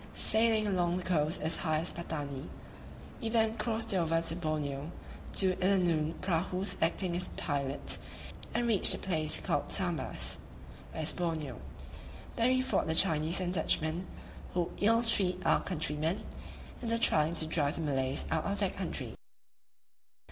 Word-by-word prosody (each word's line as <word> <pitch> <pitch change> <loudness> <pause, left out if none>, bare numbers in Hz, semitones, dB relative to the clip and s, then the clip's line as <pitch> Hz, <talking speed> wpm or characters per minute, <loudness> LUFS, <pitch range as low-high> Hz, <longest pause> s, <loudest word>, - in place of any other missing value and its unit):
Sailing 220 -1 +3
along 180 -3 +1
the 185 - -4
coast 165 -1 +1
as 160 +2 0
high 155 -3 0
as 165 +3 -1
Patani, 145 -4 -5 0.7
we 225 - -2
then 220 -1 +2
crossed 225 0 0
over 165 -3 +2
to 165 0 -2
Borneo, 150 -3 -3 0.4
two 185 -2 +4
Illanoon 170 -5 +2
prahus 185 +2 0
acting 170 +2 0
as 180 +1 +1
pilots, 140 -1 -1 0.5
and 240 - 0
reached 220 -5 +5
a - - -5
place 155 -5 0
called - - -1
Sambas - - 0 0.5
[West 155 -1 -1
Borneo]: 165 -4 -3 0.7
there 230 0 +2
we 255 0 +3
fought 260 - 0
the 160 - 0
Chinese 160 -1 +3
and 180 -1 -1
Dutchmen, 160 +1 +1 0.5
who 175 -2 0
ill 230 +3 +4
treat 185 -5 +1
our - - +4
countrymen, 160 0 -2 0.6
and 235 -2 -2
are 230 - +2
trying 160 -7 +2
to 160 - 0
drive 155 -2 0
the - - -4
Malays 135 -3 0
out - - 0
of - - -1
that - - -1
country. - - -4
170 Hz, 150 wpm, -32 LUFS, 155-195 Hz, 0.7 s, reached